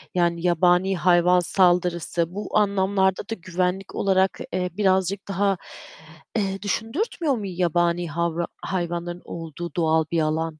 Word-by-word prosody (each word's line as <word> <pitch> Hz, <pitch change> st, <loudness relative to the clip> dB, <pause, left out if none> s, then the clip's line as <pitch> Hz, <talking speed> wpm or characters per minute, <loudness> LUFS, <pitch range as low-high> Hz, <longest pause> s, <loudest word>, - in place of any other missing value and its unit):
yani 170 Hz, -1 st, +1 dB
yabani 180 Hz, +2 st, +3 dB
hayvan 180 Hz, 0 st, +4 dB
saldırısı; 175 Hz, -1 st, +1 dB
bu 205 Hz, -, -2 dB
anlamlarda 195 Hz, -2 st, +2 dB
da 225 Hz, -, -2 dB
güvenlik 185 Hz, +1 st, -2 dB
olarak, 190 Hz, -1 st, +2 dB
eee, 180 Hz, 0 st, -1 dB
birazcık 190 Hz, -1 st, +1 dB
daha, 195 Hz, 0 st, +1 dB, 0.8 s
eee, 195 Hz, -2 st, -1 dB
düşündürtmüyor 275 Hz, -, -1 dB
mu 215 Hz, -4 st, -5 dB
yabani 175 Hz, -1 st, 0 dB
havra 170 Hz, +1 st, -1 dB, 0.2 s
hayvanların 175 Hz, -1 st, -3 dB
olduğu 165 Hz, 0 st, -7 dB
doğal 160 Hz, -2 st, +2 dB
bir 165 Hz, -1 st, +2 dB
alan? 155 Hz, +1 st, 0 dB
180 Hz, 125 wpm, -24 LUFS, 170-195 Hz, 0.8 s, hayvan